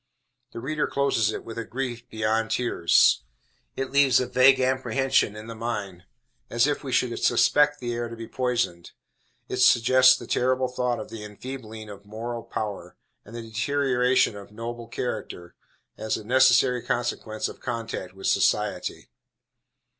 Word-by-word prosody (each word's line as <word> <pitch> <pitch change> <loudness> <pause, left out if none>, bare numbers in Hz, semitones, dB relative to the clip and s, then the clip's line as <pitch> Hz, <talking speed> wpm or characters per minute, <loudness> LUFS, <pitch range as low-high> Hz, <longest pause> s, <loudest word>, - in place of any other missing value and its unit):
The - - -7
reader 150 +5 -1
closes 135 -6 +1
it - - -6
with 115 0 -7
a - - -3
grief 120 0 -5
beyond 110 +1 0
tears. 120 - +3 0.5
It 135 -1 -4
leaves 140 -2 +5
a 125 - 0
vague 130 +2 +5
apprehension 130 -3 +1
in 105 0 -9
the 115 - -7
mind, 105 -6 -5 0.4
as 120 +1 +3
if 145 0 -1
we 135 - -5
should 125 -2 +1
suspect 150 0 +3
the 120 -1 -3
air 120 0 -3
to 115 - -8
be 115 0 -8
poisoned. 120 -9 -2 0.5
It - - -4
suggests 130 +1 +6
the - - -9
terrible 130 +1 +1
thought 125 -1 -1
of - - -7
the 110 -2 -7
enfeebling 110 0 -8
of 100 -1 -11
moral 115 +2 -5
power, 100 -6 -6 0.3
and 110 - -12
the 120 - -6
deterioration 125 +1 +1
of 100 0 -11
noble 115 +2 -7
character, 90 -9 -5 0.5
as 110 0 -1
a - - -9
necessary 125 +1 +4
consequence 115 -3 -2
of - - -10
contact 115 -6 -5
with 95 - -9
"society." - - 0
120 Hz, 155 wpm, -25 LUFS, 110-130 Hz, 0.5 s, suggests